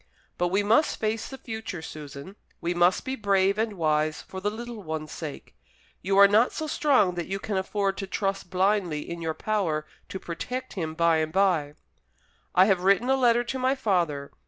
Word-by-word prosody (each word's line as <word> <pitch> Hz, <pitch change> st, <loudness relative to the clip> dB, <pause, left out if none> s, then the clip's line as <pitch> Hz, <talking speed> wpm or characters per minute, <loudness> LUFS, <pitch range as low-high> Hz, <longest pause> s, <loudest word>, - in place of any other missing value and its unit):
But 175 Hz, -, +2 dB
we 195 Hz, +3 st, +1 dB
must 230 Hz, +9 st, +3 dB
face 220 Hz, +1 st, -1 dB
the 265 Hz, -, -8 dB
future, 220 Hz, -9 st, -6 dB
Susan; 150 Hz, +4 st, -9 dB, 0.2 s
we 170 Hz, +1 st, -1 dB
must 175 Hz, +1 st, +3 dB
be 265 Hz, -, -2 dB
brave 200 Hz, -2 st, +2 dB
and 220 Hz, -1 st, 0 dB
wise, 155 Hz, -3 st, 0 dB
for 190 Hz, -, -8 dB
the 205 Hz, -, 0 dB
little 230 Hz, +1 st, -7 dB
one's 155 Hz, -3 st, -5 dB
sake. 155 Hz, -4 st, -8 dB, 0.5 s
You 195 Hz, +1 st, 0 dB
are 200 Hz, 0 st, +9 dB
not 215 Hz, +5 st, +4 dB
so 315 Hz, -, -4 dB
strong 275 Hz, -11 st, +2 dB
that 175 Hz, -1 st, -4 dB
you 195 Hz, -, -2 dB
can 200 Hz, +1 st, -4 dB
afford 195 Hz, +1 st, -1 dB
to 195 Hz, -, -4 dB
trust 195 Hz, -1 st, -2 dB
blindly 185 Hz, -4 st, 0 dB
in 170 Hz, 0 st, -6 dB
your 160 Hz, -1 st, -2 dB
power 175 Hz, -8 st, -1 dB, 0.2 s
to 190 Hz, -, -5 dB
protect 250 Hz, +11 st, -5 dB
him 160 Hz, -4 st, -4 dB
by 170 Hz, -1 st, +3 dB
and 155 Hz, 0 st, -1 dB
by. 170 Hz, -6 st, +1 dB, 0.8 s
I 185 Hz, -, +7 dB
have 190 Hz, -3 st, +2 dB
written 200 Hz, +7 st, +3 dB
a -, -, +5 dB
letter 240 Hz, -2 st, +3 dB
to 260 Hz, +2 st, -4 dB
my 260 Hz, +1 st, +2 dB
father. 170 Hz, -, 0 dB
195 Hz, 195 wpm, -26 LUFS, 170-215 Hz, 0.8 s, are